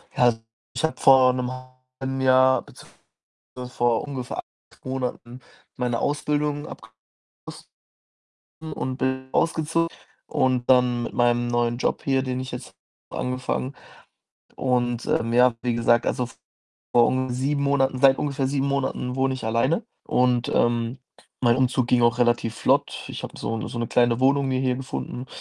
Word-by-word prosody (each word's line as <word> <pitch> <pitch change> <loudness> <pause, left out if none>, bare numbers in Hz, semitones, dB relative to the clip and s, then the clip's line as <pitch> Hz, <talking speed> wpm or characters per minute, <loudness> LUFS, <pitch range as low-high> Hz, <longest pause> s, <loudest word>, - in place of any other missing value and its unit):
Ja, - - +2
also, 120 -2 +4 0.3
ich - - -4
habe 160 - -1
vor 130 -1 +6
'nem 125 -1 -2 0.5
halben 135 0 -3
Jahr, 130 0 +5
beziehungsweise - - -18 0.6
vor 120 -1 +2
ungefähr 130 -3 -5 0.4
8 - - -26
Monaten, 125 -1 -4 0.4
meine 120 -2 -1
Ausbildung 145 0 -1
abgeschlossen. 110 -1 -14 1.6
und 130 0 -3
bin 130 0 -2
ausgezo 165 0 +1 0.4
und 130 -1 0
dann 125 -2 +4
mit - - -5
meinem 120 0 +2
neuen 120 0 0
Job - - -1
hier, 135 -1 +1
den 130 -1 -3
ich 130 0 -6
jetzt - - -8 0.4
angefangen. 130 +1 -3 0.8
Und, 120 -2 0
ähm, 115 +1 0
ja, 125 0 +5
wie 120 -2 0
gesagt, 120 0 +2
also, 125 - 0
vor - - -21 0.5
ung 130 0 0
7 140 +3 -1
Monaten 135 -2 +1
seit 135 -1 +6
ungefähr 140 -2 -1
7 140 0 0
Monaten 135 -2 -2
wohne 135 0 +1
ich 130 - -7
alleine. 130 - +1 0.2
Und, 125 -1 +2
ähm, 120 +2 +1 0.4
mein 120 -1 +4
Umzug 130 -1 +1
ging 120 -1 +3
auch 120 0 +3
relativ 120 -2 +1
flott. - - 0
Ich - - -7
habe - - -8
so 115 - -3
'ne - - -5
so 120 - -6
'ne 115 - -1
kleine 120 0 +2
Wohnung 140 +1 +3
mir 130 0 0
hier 130 -1 0
gefunden 130 -1 -6
130 Hz, 155 wpm, -24 LUFS, 120-135 Hz, 1.6 s, vor